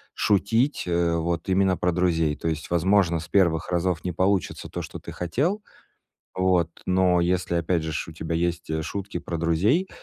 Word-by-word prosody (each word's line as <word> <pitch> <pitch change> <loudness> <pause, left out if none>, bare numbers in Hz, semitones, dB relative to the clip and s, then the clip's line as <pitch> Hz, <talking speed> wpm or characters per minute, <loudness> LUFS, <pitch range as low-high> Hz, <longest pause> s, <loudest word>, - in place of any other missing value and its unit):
шутить, 110 +7 +1
э, 85 -1 +1
вот 85 0 -2
именно 95 -1 +2
про 90 - +1
друзей. 80 -4 +1
То - - -5
есть, 80 -1 -3
возможно, 85 0 +2
с 80 - -8
1 85 -5 +2
разов 90 -2 0
не 90 - -2
получится 95 +2 0
то, - - -4
что - - -8
ты - - -9
хотел, 145 - -1 0.7
вот, 90 -3 +2 0.2
но, 90 -1 +3
если, 90 0 0
опять 85 0 0
же 80 0 -4
ж, 80 - -3
у 80 - -8
тебя 80 +1 -4
есть 85 -2 -1
шутки 100 +2 -4
про 85 0 -5
друзей, 100 - +2
85 Hz, 180 wpm, -25 LUFS, 85-95 Hz, 0.7 s, но